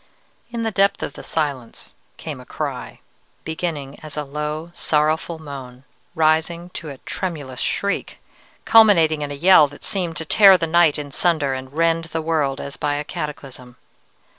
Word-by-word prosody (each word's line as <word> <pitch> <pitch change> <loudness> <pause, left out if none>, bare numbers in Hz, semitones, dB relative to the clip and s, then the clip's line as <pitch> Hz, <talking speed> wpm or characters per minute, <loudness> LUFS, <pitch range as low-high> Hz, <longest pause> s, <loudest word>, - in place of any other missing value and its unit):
"In 235 -1 -4
the 225 - -1
depth 200 -1 +2
of - - -4
the - - -10
silence 140 -7 -4 0.2
came - - -7
a - - -12
cry, - - -5 0.4
beginning 160 -4 -4
as 155 -1 -9
a 150 - -1
low, 150 +3 -5
sorrowful 155 0 0
moan, 135 -5 -9 0.3
rising 160 +2 +1
to 160 - -7
a 140 - -8
tremulous 145 -6 -5
shriek, 200 0 -2 0.5
culminating 170 -9 +5
in 145 - -3
a 145 - -5
yell 160 0 +6
that 145 - -15
seemed 175 -6 -2
to 160 - -4
tear 195 +3 +7
the 165 - -1
night 165 -2 +4
in 145 -1 -6
sunder 155 -3 +1
and 130 +1 -7
rend 165 +1 +1
the 165 0 -4
world 150 -4 0
as 140 - -6
by 145 0 -1
a 145 - -2
cataclysm. 135 -5 -7
155 Hz, 165 wpm, -21 LUFS, 145-170 Hz, 0.5 s, tear